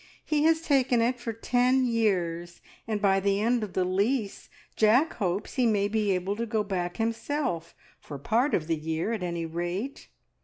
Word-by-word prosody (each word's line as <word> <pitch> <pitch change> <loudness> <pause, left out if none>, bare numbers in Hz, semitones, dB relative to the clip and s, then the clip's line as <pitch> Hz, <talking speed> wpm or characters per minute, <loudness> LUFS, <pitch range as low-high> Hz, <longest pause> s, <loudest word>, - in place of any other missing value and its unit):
He 300 -1 +1
has 320 0 +4
taken 265 -6 +2
it 245 +2 +1
for 240 -1 -4
ten 250 +3 +2
years, 180 -7 -1 0.3
and 215 -2 -1
by 195 -1 +3
the 200 +1 +1
end 235 +2 +1
of 205 - -6
the 185 - +1
lease 200 +4 -1 0.3
Jack 240 +9 +4
hopes 195 -1 -2
he 250 -2 +3
may 205 -2 +2
be 210 0 0
able 185 +2 -1
to 235 +1 -2
go 220 -1 0
back 180 -3 -3
himself, 225 - -2 0.2
for 145 - -8
part 235 - +1
of 155 - -1
the 165 0 0
year, 160 +7 -2
at 220 - -3
any 170 -2 -3
rate. 175 - -4
210 Hz, 185 wpm, -27 LUFS, 180-240 Hz, 0.3 s, has